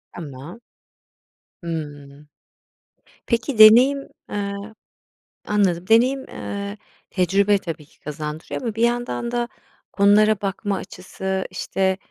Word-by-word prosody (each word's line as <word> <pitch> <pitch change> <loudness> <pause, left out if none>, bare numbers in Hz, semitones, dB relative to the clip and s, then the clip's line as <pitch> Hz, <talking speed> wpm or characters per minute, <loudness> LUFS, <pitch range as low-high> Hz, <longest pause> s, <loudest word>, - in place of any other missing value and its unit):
Tamam. 150 - -9 1.0
Hımm. 145 -3 -7 1.0
Peki 235 0 -1
deneyim 255 +6 +7 0.2
eee, 200 -1 -3 0.9
anladım. 185 -4 +1
Deneyim, 255 +4 +3
eee, 200 +1 -5 0.3
tecrübe 200 +2 +2
tabii 165 -5 -7
ki - - -28
kazandırıyor. 150 - -6
Ama 230 -4 -3
bir 225 - 0
yandan 240 0 0
da 240 -1 -1 0.4
konulara 210 +1 +4
bakma 200 +1 -2
açısı, 190 0 -5
işte, 190 0 -1
200 Hz, 100 wpm, -22 LUFS, 170-225 Hz, 1.0 s, deneyim